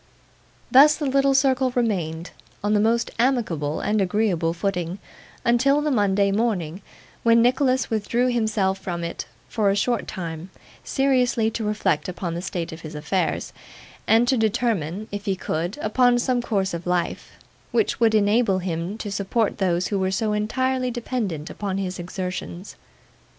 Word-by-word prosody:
Thus, 280 +3 +8
the 300 - -4
little 275 0 +3
circle 265 -1 +3
remained, 175 -9 -1 0.3
on 205 +1 +1
the 210 - +3
most 230 +2 +1
amicable 195 - 0
and 210 0 +1
agreeable 185 -4 +1
footing, 175 0 -2 0.5
until 260 +5 +3
the 300 0 0
Monday 200 -4 +2
morning, 195 -5 -1 0.4
when 230 0 +5
Nicholas 255 +1 +2
withdrew 235 +4 +1
himself 215 -5 0
from 175 -3 -4
it 170 - -5 0.2
for 210 -3 +1
a 195 - +2
short 235 +4 0
time, 170 -3 -6 0.3
seriously 250 -4 +1
to 225 - -4
reflect 210 -6 0
upon 175 -1 -4
the 170 - -4
state 175 -2 -4
of 160 +1 -9
his 155 -1 -8
affairs, 160 +5 -2 0.5
and 230 +2 +4
to 260 - +3
determine, 215 -4 0
if 205 0 -5
he 195 -2 0
could, 175 - -3
upon 245 +3 +3
some 245 0 +1
course 195 -6 -1
of 170 +1 -5
life, 180 -1 -2 0.4
which 440 - +1
would 225 -2 +4
enable 210 -1 +3
him 180 +2 -3
to 210 -2 -5
support 200 +3 -1
those 180 -2 +1
who 200 - 0
were 190 0 +1
so 210 +3 0
entirely 255 +4 0
dependent 225 - -3
upon 195 -2 -3
his 185 -2 -3
exertions. 180 +1 -5
205 Hz, 155 wpm, -23 LUFS, 180-240 Hz, 0.5 s, Thus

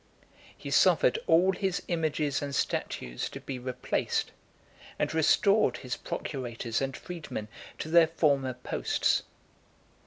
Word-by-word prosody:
He - - -7
suffered - - +4
all 180 +4 +5
his 190 -1 -2
images 155 -4 0
and 140 -1 -3
statues 60 0 -2
to - - -8
be 130 -2 -6
replaced, 125 0 -2 0.7
and - - -1
restored 160 - +3
his 125 -1 -4
procurators 120 -4 -4
and 135 -1 -2
freedmen 150 -11 -6 0.3
to - - -5
their 165 0 +6
former 140 -5 +1
posts. 125 - 0
145 Hz, 120 wpm, -29 LUFS, 130-170 Hz, 0.7 s, their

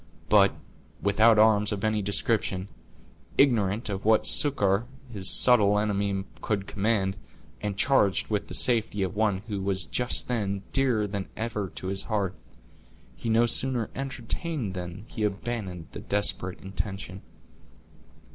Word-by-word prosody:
But, - - +5 0.4
without 110 +3 +4
arms 105 -1 +4
of 100 -2 -3
any 110 -1 +1
description, 100 -1 0 0.7
ignorant 115 -5 +2
of 95 -2 -4
what 110 0 +3
succor 110 -6 +2 0.3
his 95 -3 0
subtle 105 -5 +5
enemy 100 -2 0 0.2
could 100 -3 -1
command, 100 -2 0 0.4
and 105 -2 -3
charged 120 -7 +2
with 105 -2 -2
the - - -5
safety 110 -5 +2
of 95 - -3
one 105 -2 0
who 100 -3 -3
was 95 -1 -1
just 125 0 0
then 100 -5 -2
dearer 125 -6 +2
than 100 -1 -4
ever 110 -4 -3
to - - -6
his 95 0 -1
heart, 100 -4 -1 0.8
he 115 - -5
no 115 +1 +4
sooner 120 -1 +1
entertained 135 - -4
than 90 +2 -7
he 110 - -7
abandoned 100 -4 -3
the - - -7
desperate 100 -3 -1
intention. 95 -1 -5
105 Hz, 135 wpm, -27 LUFS, 95-115 Hz, 0.8 s, But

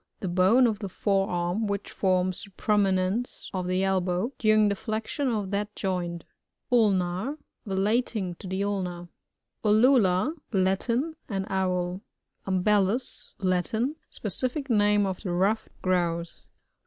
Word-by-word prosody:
— - - -51
The 190 - -2
bone 190 +8 +4
of 220 -4 0
the 200 -3 -5
fore 195 +1 0
arm, 175 +4 -1
which 200 0 -3
forms 185 -1 +1
the 205 - -10
prominence 195 +2 0
of 185 -1 -2
the 185 +1 +1
elbow, 190 +4 0
during 215 -1 +4
the 200 - +1
flexion 220 +7 -3
of 210 -5 -1
that 205 +1 -2
joint 175 -3 -2 0.5
Ulnar. 205 +2 +2
— - - -26
^Relating 200 -1 0
to - - -8
the 190 +2 -1
ulna* 180 -4 -3 0.5
XJujiJLs 220 - +4
— - - -29
Latin 235 - 0
An 195 -2 -2
Owl. 185 -1 -1 0.5
Um 185 -1 +1
bbllus. 210 +4 0
— - - -49
La< 185 -2 +1 0.2
in. 260 +7 0
Specific 255 - -3
name 205 -1 +4
of 190 -2 -3
the 185 - -3
ruffed 200 +5 +1
Grouse. 170 -2 -1
195 Hz, 150 wpm, -27 LUFS, 185-220 Hz, 0.5 s, bone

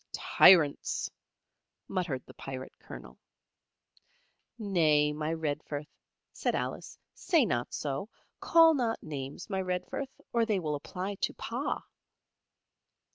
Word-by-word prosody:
"Tyrants!" 155 -6 +5 0.8
muttered 175 -9 -2
the - - -13
Pirate 130 -1 -7
Colonel. 60 +1 -11 1.4
"Nay, 155 -8 +3
my 150 +1 -2
Redforth," 150 -2 -3 0.5
said - - -1
Alice, - - -4 0.2
"say 335 -7 +2
not 120 - -1
so. 145 +8 -3 0.3
Call 330 -1 +6
not 240 -6 -1
names, 140 +2 -6
my 190 -2 -1
Redforth, 185 +9 -3 0.2
or 235 -1 +3
they 215 -4 +1
will 155 -4 -2
apply 180 +7 -4
to - - 0
Pa." - - -3
165 Hz, 110 wpm, -30 LUFS, 145-205 Hz, 1.4 s, Call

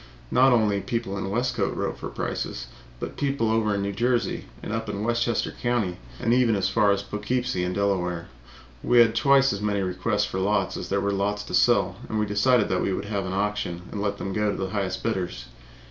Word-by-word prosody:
Not 130 +1 +5
only 105 -4 +3
people 115 -5 -3
in 95 -1 -3
Westcote 120 -1 0
wrote - - -2
for - - -5
prices, - - -4 0.3
but - - -6
people 135 -5 0
away 110 - +3
over 110 -2 +1
in 100 - -1
New 100 - -1
Jersey 120 +4 0 0.2
and - - -4
up 115 0 -3
in 100 - -3
Westchester 115 0 0
Country, 120 -8 -1 0.2
and 115 - +2
even 120 -3 +4
from - - +1
as 95 0 +1
far 105 +2 +2
away 100 - +5
as 100 - -5
Poughkeepsie 105 0 -2
and 90 0 -2
Delaware. 90 -4 0 0.5
We 120 - +2
had 115 -1 +6
twice 135 +3 +4
as 100 - -5
many 100 -1 0
requests 90 +3 0
for 95 - -4
lots 100 0 +1
as - - -5
there 100 0 +1
were 100 0 0
lots 105 +1 -1
to - - -9
sell, - - +3
and 110 - -1
we 105 - +1
decided 105 +2 +3
we - - 0
would 100 - -3
have 100 -2 -2
an 95 - -3
auction 100 -3 -2
and 100 - -4
let 100 0 -1
them 95 - -4
go 105 0 +1
to - - -2
the 95 -1 -3
highest 95 -3 -2
bidders. 90 - -2
105 Hz, 225 wpm, -25 LUFS, 95-115 Hz, 0.5 s, had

